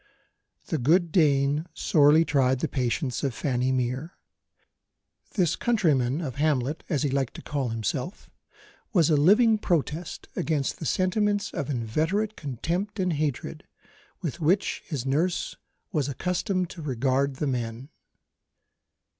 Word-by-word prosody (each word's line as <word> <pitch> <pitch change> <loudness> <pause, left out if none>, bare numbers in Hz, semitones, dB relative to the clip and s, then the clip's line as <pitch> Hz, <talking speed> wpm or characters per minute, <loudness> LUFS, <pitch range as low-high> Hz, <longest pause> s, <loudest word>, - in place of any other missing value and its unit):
The - - -2
good 165 +6 +3
Dane 145 -1 +2
sorely 155 +1 +4
tried 130 -3 +2
the - - +1
patience 130 0 -1
of 135 -4 -1
Fanny 130 -1 0
Mere. 130 +6 -2 1.2
This 175 -6 +2
countryman 155 - +1
of 135 -5 -5
Hamlet, 145 0 0
as 150 -4 0
he 145 - 0
liked 135 -2 -1
to - - -9
call 140 -4 -2
himself, 115 - -3 0.7
was 170 -5 +4
a - - +5
living 215 +9 +5
protest 165 -2 -2
against 150 -4 -1
the 160 - -3
sentiments 205 - +1
of 140 - -3
inveterate 160 - -1
contempt 170 - -3
and 180 -2 +1
hatred, 145 -3 -3 0.6
with 170 0 -3
which 175 +5 +1
his 140 -7 -3
nurse 160 +7 0 0.4
was 150 -6 0
accustomed 180 - -1
to 170 - -9
regard 135 0 0
the 150 - -2
men. 120 0 -3
150 Hz, 130 wpm, -26 LUFS, 130-175 Hz, 1.2 s, a